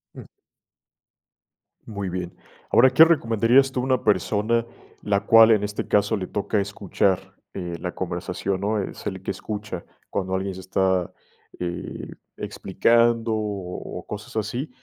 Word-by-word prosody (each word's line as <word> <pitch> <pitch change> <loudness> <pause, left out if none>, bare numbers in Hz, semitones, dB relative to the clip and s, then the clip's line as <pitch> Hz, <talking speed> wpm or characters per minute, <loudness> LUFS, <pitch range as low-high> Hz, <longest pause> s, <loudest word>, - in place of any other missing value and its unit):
Ujú. - - -10 1.6
Muy 100 -3 -4
bien. 90 -1 -5 0.4
Ahora, 130 +3 +7
¿qué 155 +6 +8
recomendarías 130 -3 +3
tú 130 - -2
a - - -4
una 130 -1 +1
persona 110 +2 +1 0.4
la 100 -1 0
cual, 115 +1 +8
en 105 -2 +3
este 105 0 -3
caso, 105 +1 +2
le 95 - -4
toca 105 +1 -1
escuchar, 100 -1 -1 0.2
eh, 90 -3 -5
la 90 0 -4
conversación?, 90 +1 -3
¿no?, 105 +1 0
es - - -7
el - - -4
que - - -2
escucha 105 -4 -6 0.2
cuando 95 -1 -2
alguien 95 0 -2
se 95 - -8
está, 95 -1 0 0.5
eh, 85 -1 -5 0.3
explicando 115 +3 +2
o 100 -4 -4
o - - -13
cosas 105 +2 -8
así, 115 +7 -2
105 Hz, 145 wpm, -24 LUFS, 95-115 Hz, 1.6 s, qué